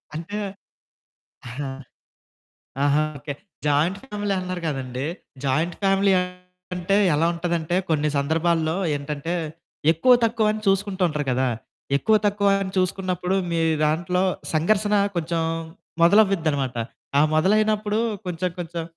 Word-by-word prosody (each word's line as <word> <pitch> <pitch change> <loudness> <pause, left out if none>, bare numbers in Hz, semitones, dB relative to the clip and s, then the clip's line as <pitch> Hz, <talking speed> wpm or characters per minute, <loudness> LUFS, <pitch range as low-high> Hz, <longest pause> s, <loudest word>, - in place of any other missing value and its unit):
అంటే 170 +6 -5 1.1
ఆహా! 135 +3 -5 1.2
ఆహా! 145 +1 +3 0.2
ఓకే. 145 0 -6 0.3
జాయింట్ 155 +7 +2
ఫ్యామిలీ 205 -3 -2
అన్నారు 185 -1 -4
కదండీ! 130 -2 -3 0.4
జాయింట్ 155 +6 0
ఫ్యామిలీ 195 0 +3 0.6
అంటే 180 +3 +1 0.2
ఎలా 160 +3 +2
ఉంటదంటే 170 0 -1
కొన్ని 150 -1 +2
సందర్భాల్లో 160 +2 +1 0.2
ఏంటంటే 150 +4 -4 0.6
ఎక్కువ, 210 +11 +4
తక్కువని 215 -1 +1
చూసుకుంటూ 195 -1 +1
ఉంటారు 150 -2 -3
కదా! 130 +1 +1 0.5
ఎక్కువ, 220 +9 +2
తక్కువ 200 0 +2
అని 190 -1 -5
చూసుకున్నప్పుడు, 185 0 -1 0.2
మీ 165 -1 0 0.3
దాంట్లో 175 +4 0 0.3
సంఘర్షణ 205 +6 +2 0.2
కొంచెం 165 0 -1 0.6
మొదలవ్విద్దనమాట. 165 - +3 0.4
ఆ - - +6
మొదలైనప్పుడు 210 +4 +2 0.3
కొంచెం 180 +1 -2
కొంచెం 170 -1 -4
175 Hz, 110 wpm, -23 LUFS, 155-195 Hz, 1.2 s, ఆ